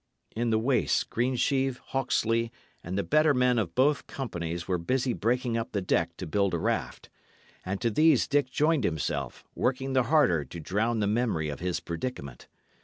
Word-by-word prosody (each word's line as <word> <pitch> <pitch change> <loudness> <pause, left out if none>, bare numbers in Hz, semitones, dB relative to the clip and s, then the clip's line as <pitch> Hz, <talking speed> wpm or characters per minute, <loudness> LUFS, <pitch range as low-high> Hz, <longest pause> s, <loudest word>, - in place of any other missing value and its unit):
In 120 +1 0
the 110 - +3
waist, 125 +4 +1
Greensheve, 130 +2 +1
Hawksley, 115 -4 0 0.3
and 90 +3 -4
the 100 - +1
better 155 -1 +3
men 125 -1 +3
of 85 -6 -3
both 145 +3 +2
companies 85 -9 -5
were 90 -2 0
busy 130 +7 0
breaking 120 +1 0
up 115 - -4
the 100 - +1
deck 85 -2 0
to 95 - -5
build 95 +2 +1
a - - 0
raft; - - -3 0.5
and 95 +1 -3
to 115 - +1
these 155 +8 +4
Dick 145 -3 +1
joined 150 +2 +2
himself, 80 -3 -2
working 130 +1 -1
the 130 - +4
harder 120 - +4
to 70 +6 -9
drown 110 +7 0
the - - +2
memory 105 -8 0
of 70 - -5
his 90 -1 -2
predicament. 85 - -6
115 Hz, 180 wpm, -28 LUFS, 90-130 Hz, 0.5 s, these